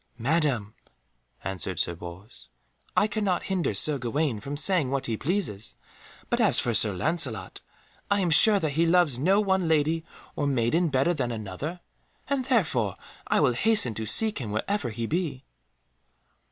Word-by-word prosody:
"Madam," 125 Hz, -5 st, -1 dB, 0.7 s
answered 95 Hz, -4 st, -3 dB
Sir 85 Hz, -, +2 dB
Bors, 90 Hz, +8 st, -11 dB, 0.5 s
"I -, -, +5 dB
cannot 210 Hz, -4 st, -1 dB
hinder 180 Hz, -, -2 dB
Sir 145 Hz, +7 st, +2 dB
Gawaine 130 Hz, 0 st, -2 dB
from 140 Hz, +7 st, -6 dB
saying 165 Hz, -4 st, +3 dB
what 135 Hz, 0 st, -2 dB
he 115 Hz, -, -2 dB
pleases, 135 Hz, -, -2 dB, 0.5 s
but -, -, 0 dB
as -, -, +3 dB
for 120 Hz, -, 0 dB
Sir 105 Hz, -1 st, +5 dB
Lancelot, 130 Hz, -, -1 dB, 0.5 s
I 200 Hz, 0 st, +2 dB
am 175 Hz, -3 st, 0 dB
sure 205 Hz, +6 st, +7 dB
that 155 Hz, -5 st, -2 dB
he 165 Hz, +4 st, +1 dB
loves 165 Hz, -7 st, +2 dB
no 190 Hz, +8 st, +3 dB
one 190 Hz, -4 st, +1 dB
lady 160 Hz, +1 st, +1 dB, 0.3 s
or 145 Hz, -, -1 dB
maiden 135 Hz, +6 st, +1 dB
better 140 Hz, +5 st, +1 dB
than 130 Hz, -6 st, -3 dB
another. 115 Hz, -, -6 dB, 0.5 s
And 275 Hz, -2 st, -1 dB
therefore 150 Hz, -, 0 dB, 0.3 s
I -, -, +2 dB
will 125 Hz, -, +3 dB
hasten 205 Hz, -, +2 dB
to 110 Hz, +1 st, -5 dB
seek 215 Hz, -, +4 dB
him 115 Hz, -, -5 dB
wherever 120 Hz, -, -2 dB
he 115 Hz, +1 st, -4 dB
be." 150 Hz, -2 st, -3 dB
145 Hz, 160 wpm, -26 LUFS, 115-180 Hz, 0.7 s, sure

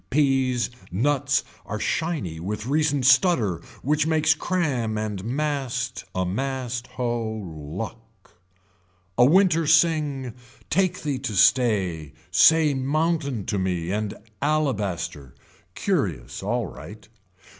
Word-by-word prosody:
Peas 130 Hz, -4 st, +2 dB, 0.2 s
nuts 135 Hz, +6 st, +1 dB, 0.2 s
are 105 Hz, +1 st, -5 dB
shiny 110 Hz, -, -2 dB
with 105 Hz, +5 st, -4 dB
recent 145 Hz, -1 st, +1 dB
stutter 125 Hz, -, +4 dB, 0.2 s
which 150 Hz, +2 st, +1 dB
makes 155 Hz, -1 st, +3 dB
cram 145 Hz, -11 st, -1 dB
and 105 Hz, -3 st, -3 dB
mast 130 Hz, -1 st, -2 dB
a 95 Hz, 0 st, 0 dB
mast 125 Hz, +4 st, -3 dB
hoe, 120 Hz, -3 st, -1 dB
luck. 95 Hz, +7 st, -8 dB, 0.8 s
A 120 Hz, -, +5 dB
winter 165 Hz, +2 st, +4 dB
sing, 150 Hz, -6 st, +2 dB, 0.4 s
take 185 Hz, +2 st, +1 dB
thee 145 Hz, -4 st, -1 dB
to 130 Hz, -5 st, -4 dB
stay, 95 Hz, -, +2 dB, 0.2 s
say 155 Hz, -, +5 dB
mountain 140 Hz, -, -1 dB
to 100 Hz, -, -1 dB
me 90 Hz, -2 st, -1 dB
and 105 Hz, 0 st, -2 dB, 0.3 s
alabaster. 105 Hz, -, -1 dB, 0.4 s
Curious 85 Hz, -, -2 dB
alright. 105 Hz, 0 st, -4 dB
125 Hz, 105 wpm, -24 LUFS, 105-150 Hz, 0.8 s, A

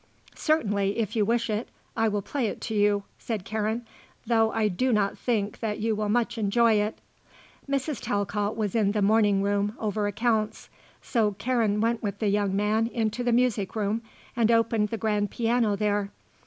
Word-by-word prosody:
"Certainly, 205 Hz, -11 st, 0 dB
if 225 Hz, -2 st, -2 dB
you 215 Hz, -, +3 dB
wish 235 Hz, +2 st, +1 dB
it, 215 Hz, +1 st, -2 dB, 0.3 s
I 225 Hz, -1 st, +2 dB
will 205 Hz, -2 st, -1 dB
play 265 Hz, 0 st, -1 dB
it -, -, -5 dB
to 220 Hz, -, -4 dB
you," 205 Hz, -1 st, +2 dB, 0.2 s
said 215 Hz, -5 st, -4 dB
Karen, 220 Hz, +2 st, -2 dB, 0.4 s
"though 225 Hz, -1 st, +3 dB
I 220 Hz, -1 st, +1 dB
do 250 Hz, +7 st, 0 dB
not 205 Hz, -3 st, +1 dB
think 215 Hz, -4 st, -1 dB
that 215 Hz, -2 st, -2 dB
you 220 Hz, 0 st, 0 dB
will 210 Hz, 0 st, -2 dB
much 235 Hz, +1 st, 0 dB
enjoy 225 Hz, +2 st, +3 dB
it." 210 Hz, +1 st, -2 dB, 0.7 s
Mrs. 275 Hz, 0 st, -1 dB
Talcott 205 Hz, +1 st, -1 dB
was 210 Hz, -3 st, -1 dB
in 205 Hz, -3 st, +2 dB
the 210 Hz, -2 st, +1 dB
morning 205 Hz, -1 st, +3 dB
room 205 Hz, +1 st, 0 dB
over 210 Hz, -1 st, -1 dB
accounts; 220 Hz, 0 st, -1 dB, 0.3 s
so 215 Hz, -4 st, +1 dB
Karen 220 Hz, -2 st, +1 dB
went 230 Hz, 0 st, +1 dB
with 200 Hz, -2 st, -3 dB
the 210 Hz, -1 st, 0 dB
young 200 Hz, -1 st, +1 dB
man 215 Hz, +3 st, +1 dB
into 230 Hz, 0 st, -2 dB
the 245 Hz, -, +1 dB
music 230 Hz, -5 st, +1 dB
room 215 Hz, +1 st, 0 dB, 0.3 s
and 230 Hz, -2 st, +2 dB
opened 230 Hz, -2 st, +2 dB
the 225 Hz, -, -3 dB
grand 210 Hz, -2 st, 0 dB
piano 230 Hz, -2 st, +1 dB
there. 205 Hz, -1 st, 0 dB
215 Hz, 180 wpm, -26 LUFS, 205-230 Hz, 0.7 s, you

